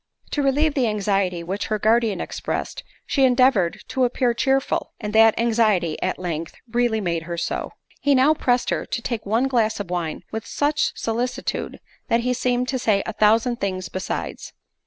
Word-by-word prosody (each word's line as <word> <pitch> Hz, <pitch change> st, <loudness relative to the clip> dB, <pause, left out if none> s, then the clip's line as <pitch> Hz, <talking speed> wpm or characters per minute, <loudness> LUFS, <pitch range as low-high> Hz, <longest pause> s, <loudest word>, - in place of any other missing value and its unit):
To 295 Hz, -, 0 dB
relieve 285 Hz, +3 st, +2 dB
the 260 Hz, -5 st, +1 dB
anxiety 195 Hz, -4 st, 0 dB
which 190 Hz, +4 st, -3 dB
her 215 Hz, -, 0 dB
guardian 220 Hz, -2 st, +2 dB
expressed, -, -, -4 dB, 0.2 s
she 275 Hz, -, +1 dB
endeavoured 250 Hz, -8 st, +3 dB
to 260 Hz, -, 0 dB
appear 245 Hz, 0 st, +1 dB
cheerful, 270 Hz, +3 st, 0 dB
and 210 Hz, -2 st, -5 dB
that 225 Hz, 0 st, +6 dB
anxiety, 215 Hz, -8 st, +2 dB
at 185 Hz, -, -1 dB
length, 165 Hz, -2 st, -4 dB
really 235 Hz, -1 st, +1 dB
made 170 Hz, -5 st, -1 dB
her 170 Hz, -, -3 dB
so. 170 Hz, -, -3 dB, 0.3 s
He 285 Hz, -1 st, +3 dB
now 270 Hz, +4 st, +5 dB
pressed 245 Hz, -5 st, +1 dB
her -, -, -2 dB
to 235 Hz, -, -3 dB
take 225 Hz, -4 st, -3 dB
one 230 Hz, +6 st, +2 dB
glass 230 Hz, -5 st, +1 dB
of 190 Hz, -3 st, -5 dB
wine 170 Hz, -3 st, -3 dB
with 220 Hz, 0 st, -5 dB
such 295 Hz, +1 st, +1 dB
solicitude, 235 Hz, +2 st, -3 dB, 0.3 s
that 230 Hz, +1 st, +2 dB
he 250 Hz, +1 st, 0 dB
seemed 250 Hz, 0 st, 0 dB
to 260 Hz, -, -1 dB
say 210 Hz, -5 st, +2 dB
a 225 Hz, -, -4 dB
thousand 225 Hz, +3 st, +3 dB
things 185 Hz, -3 st, -3 dB
besides. 185 Hz, -, -5 dB
225 Hz, 180 wpm, -23 LUFS, 195-250 Hz, 0.3 s, that